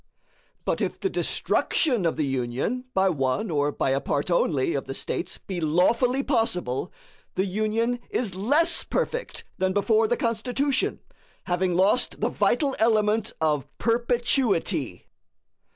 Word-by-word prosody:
But - - 0
if - - -2
the 385 - -1
destruction 245 - +1
of 165 - -1
the 155 - 0
Union 135 - -2
by 190 0 +4
one 135 +3 -1
or 145 -1 +1
by 135 - -1
a 135 +1 +1
part 145 +5 -1
only 160 -3 +1
of 140 - -2
the 135 - -5
States 170 - -3
be 185 -3 -6
lawfully 235 - +2
possible, 180 - -1 0.4
the 190 - +1
Union 215 +5 0
is 225 -6 -1
LESS 285 - +2
perfect - - -3 0.2
than 190 0 +1
before 220 +2 +3
the 240 - 0
Constitution, 250 +5 0 0.4
having 180 0 0
lost 200 +7 +2
the - - +1
vital 280 -4 +1
element 220 -1 +2
of 150 -3 0
perpetuity. 230 - 0
200 Hz, 135 wpm, -25 LUFS, 160-240 Hz, 0.4 s, by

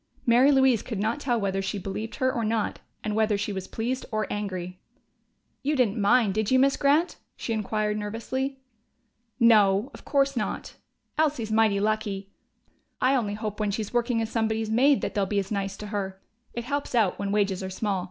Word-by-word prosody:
Mary 250 +4 +5
Louise 265 -4 +4
could 225 - -5
not 220 +7 -1
tell 245 -5 0
whether 195 -1 -1
she 195 +2 -3
believed 200 +3 -5
her 260 0 +1
or 235 - -1
not 220 -1 -1 0.2
and 210 -1 -2
whether 215 -1 +2
she 205 0 -2
was 190 -1 -5
pleased 250 +3 -3
or 215 -1 0
angry. 185 -3 -4 0.8
"You 295 +2 0
didn't 230 -5 +1
mind, 205 0 +4
did 215 0 0
you, 260 - +4
Miss 275 +1 +4
Grant?" 295 +5 +2 0.2
she 230 - -3
inquired 215 0 -1
nervously. 260 +6 -3 0.8
"No, 215 -1 +5
of - - -12
course 275 -1 +1
not. 215 -3 -3 0.5
Elsie's 280 -8 +1
mighty 215 -2 +3
lucky.... 205 -2 -1 0.7
I 255 +2 +3
only 215 -6 0
hope 215 -1 -5
when 210 -1 0
she's 210 +1 -3
working 235 -1 +1
as 220 - -5
somebody's 220 -1 0
maid 270 +5 +4
that - - -3
they'll 200 -2 0
be 205 - -1
as 195 0 -1
nice 195 -1 -2
to 210 - -7
her. 190 -2 -3 0.4
It 235 - -3
helps 280 0 -3
out, 215 -6 +2
when 200 0 -2
wages 200 -2 +1
are 190 - -4
small. 195 0 -1
215 Hz, 190 wpm, -26 LUFS, 200-245 Hz, 0.8 s, Mary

